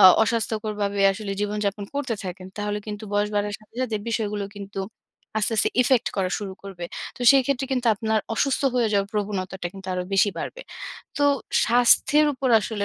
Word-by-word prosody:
আ - - +7 0.2
অস্বাস্থ্যকর 220 -1 -1
ভাবে 200 0 -1
আসলে 200 0 -5
জীবনযাপন 205 0 -1
করতে 275 -5 -1
থাকেন, 185 0 -6
তাহলে 205 0 -2
কিন্তু 210 0 -6
বয়স 205 0 +2
বাড়ার 205 0 0
সাথে, 215 +1 -24
সাথে 230 -4 -1
বিষয়গুলো 210 -3 -1
কিন্তু 200 -1 -6 0.6
আস্তে, 215 +1 +1
আস্তে 215 - +4
effect 250 -1 +3
করা 190 -2 0
শুরু 200 -2 -5
করবে। 190 -3 -7 0.3
তো - - -16
সেই 270 -1 +6
ক্ষেত্রে 275 -1 0
কিন্তু 250 -2 0
আপনার 220 +1 0 0.2
অসুস্থ 275 +5 +1
হয়ে 240 -3 +2
যাওয়ার 200 0 +1
প্রবণতাটা 190 -3 -3
কিন্তু 195 -1 -11
আরো 180 - -1
বেশি 195 +1 +4
বাড়বে। - - -5 0.6
তো 290 - +2 0.4
স্বাস্থ্যের 245 +5 +5
উপর 260 0 -1
আসলে 205 -1 -3
210 Hz, 180 wpm, -24 LUFS, 200-230 Hz, 0.6 s, আ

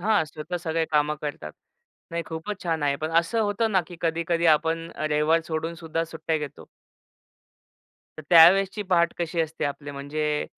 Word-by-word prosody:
हां, 205 -3 +2
स्वतः 155 +3 -6
सगळे 165 -1 -1
कामं 150 0 +2
करतात. 145 - -5 0.6
नाही, 170 0 -2
खूपच 165 +5 -6
छान 165 -3 -1
आहे, 140 -1 +1
पण 155 +2 -4
असं 225 +7 -2
होतं 215 +1 0
ना, 190 - +4
की 175 -1 -11
कधी-कधी 170 +1 0
आपण 165 +1 -3
रविवार 155 +2 +2
सोडून 160 +1 -3
सुद्धा 165 0 -3
सुट्ट्या 160 0 -3
घेतो. 150 -2 -8 1.5
तर - - -6
त्यावेळेसची 190 +5 +6
पहाट 170 -1 +3
कशी 170 0 -1
असते 160 0 -2
आपली 145 0 -4
म्हणजे 150 +2 -2
165 Hz, 160 wpm, -25 LUFS, 155-170 Hz, 1.5 s, त्यावेळेसची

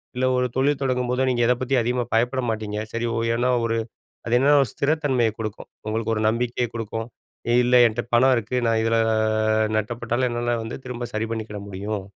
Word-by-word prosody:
இல்ல 130 - 0
ஒரு 125 - +1
தொழில் 140 +2 +2
தொடங்கும்போதோ, 125 -1 0
நீங்க 120 -1 0
எத 125 - +5
பத்தி 135 +1 0
அதிகமா 120 +1 -1
பயப்பட 125 +3 +1
மாட்டீங்க. 110 -1 -3 0.2
சரி 115 +1 -1
ஒ - - -1 0.2
ஏன்னா, 125 +2 +1 0.2
ஒரு 115 0 0 0.5
அது 120 +1 +2
என்னன்னா 145 +3 +4
ஒரு 130 - -1
ஸ்திரத்தன்மையை 140 -6 +1
குடுக்கும் 110 -2 -6 0.2
உங்களுக்கு 110 +1 -1
ஒரு 110 - -2
நம்பிக்கைய 120 +1 0
குடுக்கும் 115 0 -4 0.6
இல்ல 125 +1 +3
என்ட்ட 115 +1 -1
பணம் 130 +2 +5
இருக்கு. 115 +3 -2
நான் 115 -1 +2
இதுல 115 0 +1 0.8
நட்டப்பட்டாலும் 120 +3 -1
என்னால 120 0 -1
வந்து 110 - -6
திரும்ப 125 -1 -5
சரி 110 +1 -1
பண்ணிக்கிட 110 -2 -4
முடியும். 100 +1 -4
120 Hz, 180 wpm, -23 LUFS, 110-125 Hz, 0.8 s, எத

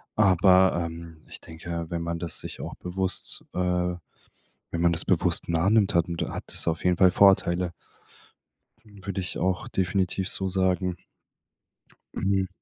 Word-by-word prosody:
aber, 95 -3 +4
ähm, 85 0 -9
ich - - -9
denke, 85 0 -6
wenn 85 -1 -3
man 85 0 -3
das 85 -1 -1
sich - - -7
auch - - -7
bewusst, 95 +1 -1
äh, 90 -1 0 0.8
wenn 85 - -2
man 85 0 +3
das 85 - +1
bewusst - - +2
nah 85 +3 +1
nimmt, 105 -3 +3
hat 85 -1 +3
'n 85 - -4 0.2
hat - - -6
das - - +1
auf 80 - -2
jeden 90 -1 +2
Fall 95 -1 +6
Vorteile 90 -3 +3 1.1
w 100 -3 -16
würde 100 -1 -3
ich 90 - -5
auch 95 -1 -1
definitiv 95 0 -1
so 95 - -1
sagen. 90 -1 0 1.2
Hm. 95 -1 0
90 Hz, 155 wpm, -26 LUFS, 85-95 Hz, 1.2 s, Fall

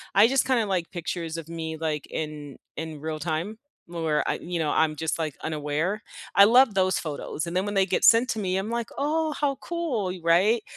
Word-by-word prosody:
I 205 +3 +7
just 270 +2 +2
kinda, 255 -4 +2
like, 180 -4 -1
pictures 170 -2 -4
of 165 -1 -8
me, 160 -1 -5
like, 155 -2 -2
in 150 -3 -5 0.2
in 160 -2 -6
real 155 0 -4
time 165 +7 -3 0.3
where 165 -3 -1
I, - - +1
you 175 0 -3
know, 155 -2 0
I'm 155 -1 +2
just, 160 +1 -2
like, 155 -3 -2
unaware. 155 +6 -2 0.3
I 200 - +9
love 245 +1 +6
those 185 -1 +2
photos 155 0 -4
and 170 +2 -2
then 185 - +1
when 205 - -3
they 195 -1 +3
get - - 0
sent 235 +1 +6
to 220 - -1
me, 185 -3 -1
I'm, 195 +3 -2
like, 235 0 -2
"Oh, 310 +2 0
how 285 -2 +1
cool," 330 - -2
y 185 - -7
right? 195 +7 +4
175 Hz, 215 wpm, -26 LUFS, 160-220 Hz, 0.3 s, I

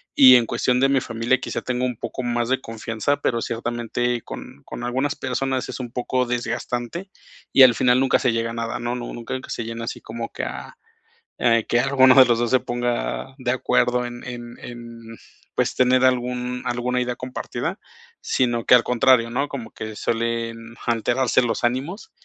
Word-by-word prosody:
Y 130 -2 +9
en 120 -2 +4
cuestión 125 +2 +1
de 135 - +4
mi 135 -1 +3
familia, 115 +2 0
quizá, - - -4
tenga 125 0 -1
un 125 -2 -2
poco 130 - -5
más 120 0 -1
de 130 - +2
confianza, 115 +4 -2
pero 115 -2 0
ciertamente 120 +1 -2
con 70 - -10
con 120 - -7
algunas 130 +4 -1
personas 130 0 -2
es - - -6
un 120 -2 -6
poco 125 0 -1
desgastante, 120 +7 -3 0.4
y 135 - +9
al 125 -2 +8
final 125 +2 +3
nunca 135 - +3
se 125 - +2
llega 115 0 -1
a - - -7
nada, 115 0 -3
¿no? 120 +1 -2
Nu 120 -1 -6
nunca 120 +2 -5
se 120 - -4
llena 115 0 -5
así - - -6
como 115 +1 -6
que - - -5
a - - -6 0.6
eh, 115 -2 +3
que 120 - +3
alguno 130 -2 +5
de 130 - +10
los 120 -1 +2
dos 120 -1 0
se 130 - +4
ponga 120 +2 -3
de 125 -1 -1
acuerdo 125 -1 +1
en 120 0 -7
en 120 -1 -8
en, 115 -1 -10 0.4
pues, - - 0
tener 130 0 +4
algún 125 0 0
alguna 125 +1 -1
idea 125 0 -1
compartida, 125 0 -4 0.4
sino 120 -2 0
que - - +6
al 120 - +7
contrario, 125 -1 +3
¿no? 140 +4 0
Como 125 -5 -7
que 110 0 -7
suelen 115 0 -3
alterarse 120 +2 +2
los 115 -1 -1
ánimos. 140 - -2
120 Hz, 190 wpm, -22 LUFS, 115-130 Hz, 0.6 s, de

